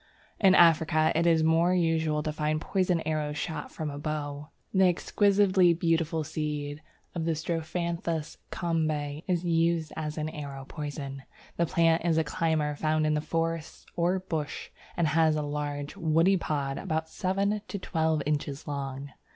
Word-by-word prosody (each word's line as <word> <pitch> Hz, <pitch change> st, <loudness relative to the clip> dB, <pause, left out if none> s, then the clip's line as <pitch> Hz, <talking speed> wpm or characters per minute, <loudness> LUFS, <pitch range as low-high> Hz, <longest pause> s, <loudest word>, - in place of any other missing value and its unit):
In 190 Hz, -2 st, +6 dB
Africa 160 Hz, -2 st, +5 dB
it 170 Hz, +1 st, +2 dB
is 165 Hz, -1 st, +4 dB
more 165 Hz, +3 st, +3 dB
usual 160 Hz, -3 st, +1 dB
to 155 Hz, -, -1 dB
find 155 Hz, 0 st, 0 dB
poisoned 180 Hz, -1 st, 0 dB
arrows 150 Hz, -1 st, -1 dB
shot 160 Hz, +1 st, -4 dB
from 155 Hz, -2 st, -4 dB
a 145 Hz, -, -6 dB
bow. 145 Hz, -1 st, -4 dB, 0.2 s
The 190 Hz, -1 st, +5 dB
exquisitely 190 Hz, -1 st, +3 dB
beautiful 165 Hz, -1 st, +1 dB
seed 150 Hz, -1 st, -4 dB, 0.3 s
of 170 Hz, -, -3 dB, 0.2 s
Strophanthus 165 Hz, 0 st, -3 dB
Kombe 155 Hz, -4 st, -1 dB
is 180 Hz, -2 st, 0 dB
used 165 Hz, -1 st, +1 dB
as 155 Hz, 0 st, -4 dB
an 155 Hz, 0 st, -2 dB
arrow 140 Hz, -3 st, -7 dB
poison. 145 Hz, -3 st, -6 dB, 0.4 s
The 170 Hz, -, +2 dB
plant 165 Hz, 0 st, +3 dB
is 165 Hz, -2 st, +2 dB
a 160 Hz, -, +3 dB
climber 155 Hz, -1 st, 0 dB
found 155 Hz, +1 st, +1 dB
in 155 Hz, 0 st, +1 dB
forests 165 Hz, 0 st, -3 dB
or 175 Hz, +2 st, +2 dB
bush, 160 Hz, -5 st, -4 dB, 0.3 s
and 170 Hz, -2 st, +2 dB
has 160 Hz, 0 st, +3 dB
large 145 Hz, -1 st, -3 dB
woody 165 Hz, +4 st, +3 dB
pods 140 Hz, -6 st, -2 dB
about 160 Hz, -4 st, -2 dB
seven 200 Hz, +4 st, -1 dB
to 200 Hz, -, -4 dB
twelve 160 Hz, -5 st, 0 dB
inches 145 Hz, -1 st, -2 dB
long. 140 Hz, -1 st, -4 dB
160 Hz, 150 wpm, -28 LUFS, 150-170 Hz, 0.4 s, In